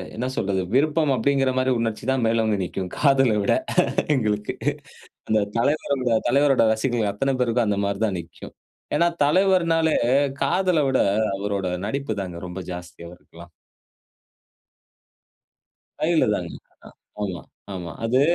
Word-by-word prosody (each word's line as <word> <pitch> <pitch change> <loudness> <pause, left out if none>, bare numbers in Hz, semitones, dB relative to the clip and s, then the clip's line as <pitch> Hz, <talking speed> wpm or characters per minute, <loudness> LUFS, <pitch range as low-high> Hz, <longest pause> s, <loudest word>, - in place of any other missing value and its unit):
என்ன 125 +3 -2
சொல்றது, 95 -1 0
விருப்பம் 150 0 +2
அப்டிங்குறமாரி 130 0 +1
உணர்ச்சி 115 -2 -3
தான் 130 -3 0
மேல் 115 0 +2
ஓங்கி 105 -2 0
நிக்கும். 90 +1 -4
காதல 135 -6 +3
விட - - +2 0.6
எங்களுக்கு. 105 -3 -1 0.7
அந்த 110 -1 +3 0.2
தலைவரோட, 140 -1 0 0.2
தலைவரோட 135 0 +3
ரசிகர்கள் 110 -1 0
அத்தன 135 +6 -1
பேருக்கும், 120 -1 +1
அந்த 100 -1 0
மாரி 100 0 -3
தான் 95 - -2
நிக்கும். 85 - -12 0.4
ஏன்னா 170 - +3 0.2
தலைவர்னாலே, 165 -1 +3 0.5
காதல 180 +3 +2
விட 130 - +2 0.4
அவரோட 100 -1 -2 0.2
நடிப்பு 135 +1 -3
தாங்க 90 -3 -7
ரொம்ப 90 +1 -6
ஜாஸ்தியா 90 -1 -9
அவருக்குல்லாம். 85 -1 -15 2.5
கைல 165 +1 +2
தாங்க. 85 -3 -4 0.7
அ, - - -1
ஆமா. 90 -4 -5 0.3
ஆமா. 90 -2 -6 0.2
அது. 130 +3 +2
115 Hz, 125 wpm, -23 LUFS, 100-140 Hz, 2.5 s, காதல